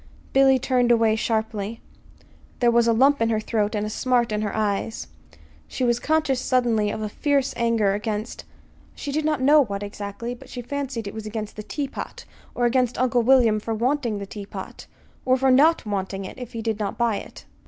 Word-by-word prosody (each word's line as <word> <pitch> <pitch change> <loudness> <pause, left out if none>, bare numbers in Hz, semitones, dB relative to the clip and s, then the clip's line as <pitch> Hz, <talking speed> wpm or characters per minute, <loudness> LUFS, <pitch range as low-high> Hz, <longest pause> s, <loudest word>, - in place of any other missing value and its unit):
Billy 270 0 +5
turned 250 -1 +2
away 225 -2 +4
sharply. 220 -1 -2 0.8
There 240 -1 +4
was 235 0 +3
a - - +5
lump 270 +4 +4
in 225 - +2
her 220 -1 +1
throat 215 -1 -1
and 210 0 -1
a - - -3
smart 245 0 +1
in 210 0 -1
her 210 -2 -3
eyes. 215 +1 -1 0.6
She - - -4
was 240 -1 +2
conscious 305 -4 +1
suddenly 235 -5 +1
of 215 +1 -4
a - - -1
fierce 280 +4 0
anger 230 -4 +2
against 210 +2 -4 0.5
she 285 - -5
did 305 +2 -1
not 305 -4 0
know 295 +2 +6
what, 200 -4 -5
exactly; 205 +3 -5
but 245 - -13
she 245 - -6
fancied 265 -4 -4
it 200 - -6
was 220 -1 -6
against 215 -1 -5
the 215 - -6
teapot, 280 +5 -6 0.3
or 245 - +1
against 250 0 +1
Uncle 245 -1 +2
William 235 -3 +4
for 225 +1 -3
wanting 240 -1 0
the 200 - -5
teapot, 200 0 -9 0.4
or 255 0 +3
for 265 0 +3
not 300 +4 +4
wanting 195 -1 -3
it 190 - -9
if 250 -1 -8
he 225 -1 -5
did 220 -2 -1
not 205 -2 -3
buy 235 -3 +1
it. - - -10
230 Hz, 200 wpm, -24 LUFS, 215-255 Hz, 0.8 s, know